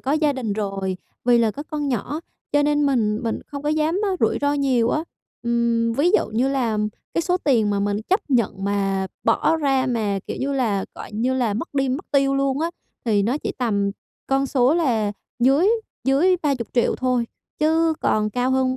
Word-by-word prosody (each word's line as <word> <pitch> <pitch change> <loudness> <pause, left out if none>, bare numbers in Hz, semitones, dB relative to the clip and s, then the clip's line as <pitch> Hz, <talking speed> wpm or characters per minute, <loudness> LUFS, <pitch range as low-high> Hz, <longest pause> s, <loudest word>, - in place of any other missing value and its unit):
có 270 - -1
gia 305 -1 +2
đình 250 -6 -3
rồi, 195 -2 -2 0.3
vì 240 0 +5
là 230 -2 +3
có 285 - -7
con 300 -2 -3
nhỏ, 260 +5 -2 0.3
cho 290 0 +4
nên 295 0 +2
mình 220 -6 +1
mình 230 -1 -2
không 285 -1 -7
có 295 - -1
dám 310 +4 +1
á 405 - +1
rủi - - +2
ro 285 0 +2
nhiều 260 -5 +2
á. 305 - 0 0.4
Ừm, 235 -1 +1
ví 285 +9 +2
dụ 425 - +3
như 240 +5 +1
là 245 -6 0 0.4
cái 335 - +1
số 360 +2 +1
tiền 245 - +2
mà 200 -1 0
mình 205 0 0
chấp 380 +3 +3
nhận 210 -6 +1
mà 195 -1 0 0.2
bỏ 325 - +3
ra, 270 -4 +1
mà 215 -5 0
kiểu - - -4
như 275 +2 -1
là, 225 -8 0
gọi - - -9
như 240 +5 0
là, 240 -5 0
mất 255 - -5
đi 270 -1 +1
mất 270 +8 -3
tiêu 275 -1 +3
luôn 275 0 0
á 330 +1 0 0.3
thì 210 -4 +2
nó 240 +8 0
chỉ - - -3
tầm 205 -5 +1 0.4
con 270 0 +1
số 265 +1 +3
là 230 -11 +1 0.3
dưới 270 +9 +4 0.4
dưới 305 +8 +4
30.000.000 255 -5 0
thôi, 250 -2 0 0.3
chứ 320 +1 +3
còn 215 0 +1
cao 250 +4 0
hơn 260 0 +1
260 Hz, 205 wpm, -22 LUFS, 225-290 Hz, 0.4 s, vì